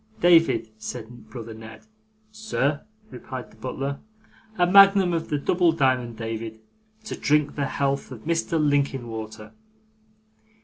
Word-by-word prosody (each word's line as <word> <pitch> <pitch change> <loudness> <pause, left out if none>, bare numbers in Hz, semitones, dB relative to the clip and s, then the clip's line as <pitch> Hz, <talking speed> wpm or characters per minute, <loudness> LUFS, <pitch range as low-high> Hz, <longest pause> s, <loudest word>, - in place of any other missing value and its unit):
'David,' 165 -9 +4
said 120 +1 -8
brother 115 -2 -8
Ned. 110 0 -12 0.5
'Sir,' 155 -10 -1 0.3
replied 130 -1 -8
the - - -19
butler. 135 +5 -4 0.6
'A 175 - +4
magnum 195 -1 +6
of 165 -1 -2
the 150 - 0
double 175 +4 +2
diamond, 130 -6 +1
David, 115 -1 -5 0.4
to 220 - -5
drink 150 0 +1
the 140 -1 -2
health 140 0 -1
of 120 -4 -9
Mr 165 0 0
Linkinwater. 120 -7 -2
140 Hz, 125 wpm, -24 LUFS, 115-165 Hz, 0.6 s, magnum